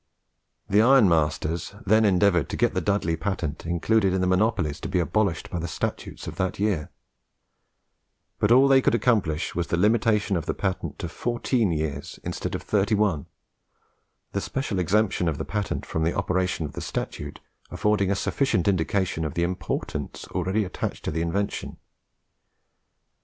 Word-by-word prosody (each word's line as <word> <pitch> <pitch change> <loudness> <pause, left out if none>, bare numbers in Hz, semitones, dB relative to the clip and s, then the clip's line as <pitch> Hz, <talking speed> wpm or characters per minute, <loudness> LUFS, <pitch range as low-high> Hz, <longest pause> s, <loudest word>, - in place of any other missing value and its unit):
The 100 +1 +3
ironmasters 85 - +3
then 110 +3 +4
endeavoured 90 -4 +3
to - - -3
get - - +2
the - - 0
Dudley 100 -5 0
patent 85 -6 -3
included 95 +3 +2
in 95 - +1
the - - +2
monopolies 95 -5 +1
to - - -5
be - - 0
abolished 90 0 0
by 85 - -2
the 85 - -3
statute 80 - -4
of - - -7
that 95 -2 -1
year; 100 -7 0 1.5
but - - +2
all 130 +3 +7
they 135 -1 +6
could 120 - +3
accomplish 105 -9 +1
was 85 -2 -2
the 85 - 0
limitation 105 0 +2
of 85 - -3
the - - -1
patent 95 -1 -3
to - - -4
fourteen 120 -3 0
years 75 -3 -3
instead - - -3
of - - -5
thirty 105 +1 +1
one; 100 -9 +1 1.0
the - - -2
special 130 -8 -2
exemption 95 0 +1
of 75 - -3
the 80 - -4
patent 105 -2 -3
from 80 - -3
the 85 - 0
operation 90 -3 0
of 75 - -7
the - - -6
statute - - -5 0.3
affording 105 -2 +1
a 100 - +2
sufficient 110 -3 0
indication 95 -2 +1
of 75 0 -4
the 85 - +1
importance 85 -5 -3
already 95 +4 0
attached 90 - -5
to - - -1
the 80 +1 -2
invention. 95 +5 -2
95 Hz, 165 wpm, -25 LUFS, 85-105 Hz, 1.5 s, all